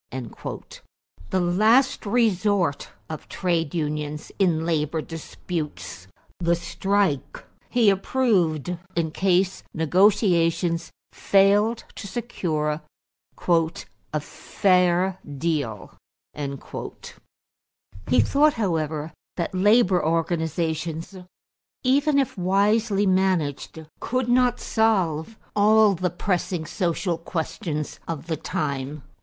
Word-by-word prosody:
The 185 Hz, -, +1 dB
last 215 Hz, +9 st, +3 dB
resort 200 Hz, -7 st, +1 dB, 0.2 s
of 155 Hz, -1 st, -8 dB
trade 170 Hz, -4 st, -1 dB
unions 150 Hz, -1 st, -3 dB
in 165 Hz, -4 st, +2 dB
labor 160 Hz, -1 st, 0 dB
disputes, 150 Hz, -, -6 dB, 0.3 s
the 170 Hz, -1 st, +2 dB
strike, 190 Hz, -2 st, -1 dB, 0.3 s
he 230 Hz, -5 st, +4 dB
approved 180 Hz, -, +1 dB, 0.2 s
in 165 Hz, -2 st, 0 dB
case 190 Hz, +1 st, +1 dB
negotiations 170 Hz, -1 st, +2 dB, 0.2 s
failed 205 Hz, +4 st, +3 dB
to 200 Hz, -, -8 dB
secure 165 Hz, -9 st, -2 dB, 0.7 s
"a 165 Hz, -2 st, -1 dB
fair 180 Hz, +2 st, +1 dB, 0.2 s
deal." 140 Hz, -, -2 dB, 0.4 s
He 135 Hz, -5 st, -5 dB
thought, 290 Hz, -, +3 dB
however, 160 Hz, -7 st, -2 dB, 0.2 s
that 170 Hz, 0 st, -2 dB
labor 195 Hz, -1 st, +4 dB
organizations, 160 Hz, +1 st, -1 dB, 0.7 s
even 280 Hz, +3 st, +3 dB
if 275 Hz, -3 st, +1 dB
wisely 200 Hz, +3 st, +2 dB
managed, 180 Hz, -5 st, 0 dB
could 255 Hz, 0 st, -1 dB
not 245 Hz, 0 st, +3 dB
solve 210 Hz, -4 st, 0 dB, 0.2 s
all 210 Hz, 0 st, +5 dB
the 180 Hz, 0 st, -1 dB
pressing 175 Hz, -1 st, -2 dB
social 170 Hz, 0 st, -1 dB
questions 160 Hz, -2 st, -4 dB
of 165 Hz, -2 st, -4 dB
the 160 Hz, -2 st, -2 dB
time. 140 Hz, -1 st, -3 dB
175 Hz, 90 wpm, -24 LUFS, 160-200 Hz, 0.7 s, all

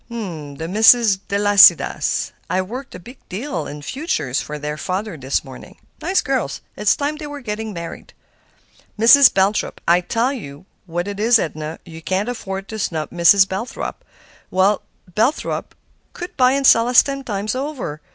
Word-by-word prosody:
"'The 160 Hz, -10 st, -6 dB
Misses 220 Hz, +2 st, +5 dB
Delasidas.' 205 Hz, 0 st, +4 dB, 0.2 s
I 185 Hz, -, 0 dB
worked 250 Hz, +9 st, -6 dB
a -, -, -8 dB
big 245 Hz, +9 st, -14 dB
deal 210 Hz, -, -4 dB
in 145 Hz, 0 st, -9 dB
futures 260 Hz, -, -2 dB
for 150 Hz, -, -6 dB
their 150 Hz, 0 st, -4 dB
father 185 Hz, +6 st, -4 dB
this 135 Hz, -2 st, -2 dB
morning; -, -, -12 dB, 0.2 s
nice 385 Hz, -, +1 dB
girls; 260 Hz, -, -2 dB, 0.2 s
it's 210 Hz, +1 st, +2 dB
time 295 Hz, +1 st, -2 dB
they 300 Hz, -1 st, -7 dB
were 290 Hz, 0 st, -7 dB
getting 220 Hz, -3 st, -5 dB
married. 170 Hz, -3 st, -8 dB, 0.8 s
'Mrs. 255 Hz, +5 st, +7 dB
Belthrop.' 195 Hz, +2 st, 0 dB
I 175 Hz, +1 st, +4 dB
tell 230 Hz, +8 st, -1 dB
you 145 Hz, -, -9 dB, 0.2 s
what 175 Hz, +2 st, -3 dB
it 200 Hz, 0 st, -5 dB
is, 230 Hz, +2 st, +5 dB
Edna; 155 Hz, -4 st, -4 dB
you 165 Hz, -2 st, -11 dB
can't 190 Hz, +6 st, -1 dB
afford 195 Hz, -5 st, -5 dB
to 220 Hz, -, -6 dB
snub 160 Hz, -6 st, -3 dB
Mrs. 185 Hz, +3 st, +5 dB
Belthrop. 195 Hz, +6 st, -5 dB, 0.5 s
Why, 190 Hz, +2 st, +2 dB, 0.3 s
Belthrop 220 Hz, -, -1 dB, 0.4 s
could 355 Hz, 0 st, -8 dB
buy 255 Hz, -1 st, +4 dB
and 275 Hz, 0 st, 0 dB
sell 230 Hz, -2 st, +6 dB
us 245 Hz, -1 st, +6 dB
ten 275 Hz, -1 st, -5 dB
times 210 Hz, -3 st, -3 dB
over. 255 Hz, -, -5 dB
205 Hz, 160 wpm, -20 LUFS, 170-245 Hz, 0.8 s, Mrs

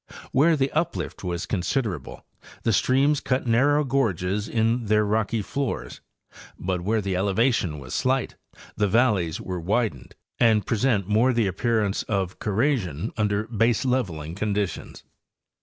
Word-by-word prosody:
Where 160 Hz, +5 st, +4 dB
the 135 Hz, -1 st, 0 dB
uplift 165 Hz, -7 st, -2 dB
was 90 Hz, -1 st, -3 dB
considerable 95 Hz, -, -3 dB, 0.4 s
the 115 Hz, -, +2 dB
streams 135 Hz, +7 st, +3 dB
cut 130 Hz, 0 st, -1 dB
narrow 140 Hz, +6 st, +3 dB
gorges 105 Hz, -, 0 dB
in 115 Hz, +1 st, 0 dB
their 105 Hz, 0 st, +3 dB
rocky 110 Hz, +1 st, 0 dB
floors, 140 Hz, +5 st, -4 dB, 0.6 s
but' 90 Hz, -1 st, -2 dB
where 110 Hz, +4 st, 0 dB
the 95 Hz, -2 st, -2 dB
elevation 100 Hz, -, +1 dB
was 65 Hz, -3 st, -8 dB
slight 130 Hz, 0 st, 0 dB, 0.4 s
the 105 Hz, -1 st, +1 dB
valleys 100 Hz, -7 st, +2 dB
were 90 Hz, -1 st, -4 dB
widened 100 Hz, -, -2 dB, 0.2 s
and 110 Hz, -3 st, +4 dB
present 115 Hz, -4 st, +1 dB
more 115 Hz, +5 st, +3 dB
the 115 Hz, -3 st, +2 dB
ap 95 Hz, -, -4 dB
pearance 110 Hz, -4 st, +1 dB
of 95 Hz, -3 st, -2 dB
corrasion 105 Hz, -, -1 dB
under 105 Hz, -1 st, 0 dB
baseleveling 115 Hz, -, 0 dB
conditions. 105 Hz, -1 st, -3 dB
110 Hz, 135 wpm, -25 LUFS, 95-125 Hz, 0.6 s, Where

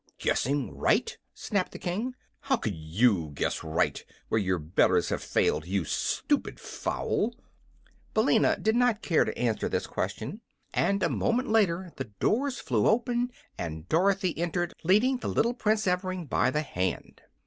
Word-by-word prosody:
"Guessing 140 Hz, +1 st, 0 dB
right?" 460 Hz, -, +1 dB, 0.2 s
snapped 200 Hz, -4 st, -2 dB
the -, -, -6 dB
King. 220 Hz, +9 st, -3 dB, 0.2 s
"How 265 Hz, -, +1 dB
could 110 Hz, -, -2 dB
you 80 Hz, 0 st, +1 dB
guess -, -, -1 dB
right, 80 Hz, 0 st, 0 dB, 0.3 s
where 110 Hz, -, +2 dB
your 95 Hz, -2 st, +1 dB
betters 80 Hz, +2 st, +2 dB
have -, -, -2 dB
failed, 80 Hz, -, +1 dB
you 95 Hz, -2 st, 0 dB
stupid -, -, -1 dB
fowl?" 230 Hz, +3 st, -2 dB, 0.8 s
Billina -, -, +4 dB
did 220 Hz, +1 st, +1 dB
not 240 Hz, -3 st, +2 dB
care 165 Hz, -, +3 dB
to -, -, -4 dB
answer 115 Hz, -3 st, 0 dB
this -, -, -1 dB
question, -, -, -4 dB, 0.3 s
and 200 Hz, -1 st, +1 dB
a -, -, +4 dB
moment 245 Hz, +3 st, 0 dB
later 190 Hz, -5 st, +2 dB
the 135 Hz, -, -3 dB
doors 240 Hz, -, 0 dB
flew 110 Hz, -5 st, +1 dB
open 245 Hz, +2 st, +1 dB, 0.3 s
and 80 Hz, -1 st, -5 dB
Dorothy 190 Hz, +2 st, +2 dB
entered, 175 Hz, 0 st, -1 dB
leading 215 Hz, +10 st, +4 dB
the -, -, -5 dB
little 235 Hz, +1 st, +2 dB
Prince 215 Hz, -2 st, +1 dB
Evring 185 Hz, -1 st, -1 dB
by -, -, +2 dB
the 150 Hz, +1 st, 0 dB
hand. 90 Hz, -, -3 dB
180 Hz, 155 wpm, -28 LUFS, -, 0.8 s, Billina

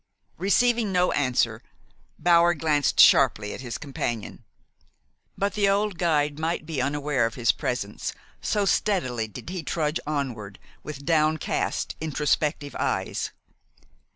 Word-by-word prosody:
Receiving 225 Hz, +3 st, +2 dB
no 180 Hz, -1 st, +2 dB
answer, 120 Hz, -5 st, +1 dB, 0.6 s
Bower 170 Hz, +1 st, +4 dB
glanced 150 Hz, -2 st, +1 dB
sharply 105 Hz, -1 st, +5 dB
at -, -, -7 dB
his 120 Hz, -3 st, -5 dB
companion; 120 Hz, -6 st, -5 dB, 0.9 s
but 200 Hz, +1 st, 0 dB
the 200 Hz, -2 st, +2 dB
old 200 Hz, -2 st, 0 dB
guide 150 Hz, -4 st, +1 dB
might 160 Hz, 0 st, -2 dB
be 150 Hz, -5 st, -2 dB
unaware 140 Hz, -2 st, 0 dB
of 115 Hz, -, -8 dB
his 120 Hz, -2 st, +3 dB
presence, 105 Hz, -4 st, -3 dB, 0.3 s
so 205 Hz, -1 st, 0 dB
steadily 145 Hz, -, 0 dB
did 110 Hz, -, -9 dB
he 185 Hz, -2 st, -4 dB
trudge 155 Hz, 0 st, -1 dB
onward, 120 Hz, -10 st, -3 dB, 0.2 s
with 140 Hz, -2 st, -8 dB
downcast, 155 Hz, -1 st, 0 dB
introspective 150 Hz, -1 st, -1 dB
eyes. -, -, -1 dB
150 Hz, 125 wpm, -25 LUFS, 130-175 Hz, 0.9 s, sharply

